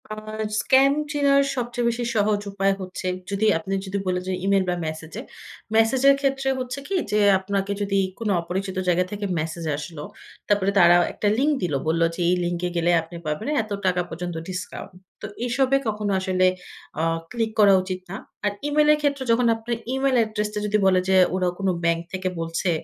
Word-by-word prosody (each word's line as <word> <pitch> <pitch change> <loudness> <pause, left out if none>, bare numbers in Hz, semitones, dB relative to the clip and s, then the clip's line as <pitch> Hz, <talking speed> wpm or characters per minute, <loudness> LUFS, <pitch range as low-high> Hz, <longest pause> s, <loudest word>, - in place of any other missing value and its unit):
আ - - -4 0.5
scam 270 +1 +4 0.2
চেনার 280 -1 +3
সবচেয়ে 240 -1 -2
বেশি 235 +1 -2
সহজ 210 -1 +2
উপায় 195 0 +1
হচ্ছে 185 0 -6 0.2
যদি 200 +2 0
আপনি 180 +4 -5
যদি 190 +1 -3
বলেন 180 -1 0
যে, 190 - -1
ইমেইল 195 -1 +3
বা 180 - +1
মেসেজে। 160 +6 -6 0.5
মেসেজের 265 +5 +5
ক্ষেত্রে 270 -1 0
হচ্ছে 255 +2 -4
কি? 390 - -2 0.2
যে, 210 - +2 0.2
আপনাকে 195 +1 -2
যদি 200 -1 +1 0.2
কোন 225 -2 -2
অপরিচিত 190 +2 -4
জায়গা 180 +1 +2
থেকে 205 0 -4
মেসেজ 165 +2 -4
আসলো, 150 0 -7 0.4
তারপরে 200 -1 +2
তারা 175 -1 +7 0.2
একটা 210 - -2
লিঙ্ক 290 +4 +2
দিল। 170 -4 -1
বলল 165 +1 +1
যে, - - -10
এই 180 - +3
লিঙ্কে 175 +1 -2
গেলে 170 +1 +2
আপনি 165 +2 -12
পাবেনে 155 - -2
এত 215 - -14
টাকা 180 -1 +2
পর্যন্ত 175 +1 -5
ডিসকাউন্ট। 185 +1 -6 0.3
তো - - -5 0.2
এসবে 265 +2 +2
কখনো 210 -1 -1
আসলে 185 -1 +1 0.6
অ - - 0 0.3
ক্লিক 225 -2 -1
করা 200 -2 +7
উচিত 185 0 -4
না। 195 - -5 0.3
আর 205 - +2 0.2
Email 300 +1 +3
এর - - +1
ক্ষেত্রে 280 -2 0
যখন 235 +1 +3
আপনার 230 +1 -4 0.2
Email 265 0 +1
অ্যাড্রেসটা 210 -1 -1
যদি 210 0 +2
বলে 185 -1 +4
যে, 190 - +4 0.2
ওরা 185 -1 +1
কোন 195 - -1 0.2
ব্যাংক 170 0 +2
থেকে 185 0 -2
বলছে। 165 +3 -2
200 Hz, 185 wpm, -23 LUFS, 180-235 Hz, 0.6 s, তারা